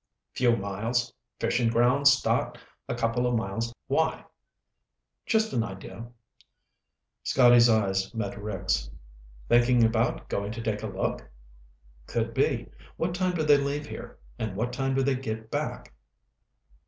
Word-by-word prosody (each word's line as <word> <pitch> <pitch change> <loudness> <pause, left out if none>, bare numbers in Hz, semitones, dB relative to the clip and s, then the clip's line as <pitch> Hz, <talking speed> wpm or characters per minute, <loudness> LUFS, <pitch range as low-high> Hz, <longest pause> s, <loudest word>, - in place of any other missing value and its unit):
"Few 120 -2 +3
miles. 115 +5 -2 0.3
Fishing 120 -2 +1
grounds 125 +5 +4
start 135 - 0 0.3
a - - -1
couple 115 +2 0
of 125 - +1
miles 115 +1 -2
out. 120 - -17
Why?" 160 +4 0 1.0
"Just 220 -1 +2
an 120 - +2
idea." 95 +1 -8 1.1
Scotty's 120 -2 +6
eyes 95 -3 +1
met 105 -3 -3
Rick's. 90 - -2 0.6
"Thinking 120 0 +4
about 115 +1 +1
going 100 +2 -3
to 115 - -6
take 105 -2 -2
a - - -3
look?" - - -3 0.8
"Could - - -2
be. - - 0 0.3
What 170 +1 -1
time 180 0 0
do 160 - 0
they 145 -1 +6
leave 140 +1 -2
here, - - -9 0.2
and 110 -4 -3
what 120 +4 -2
time 135 +1 -1
do 135 - +2
they 135 +1 +2
get 110 -4 -5
back?" - - -4
120 Hz, 140 wpm, -27 LUFS, 110-135 Hz, 1.1 s, Scotty's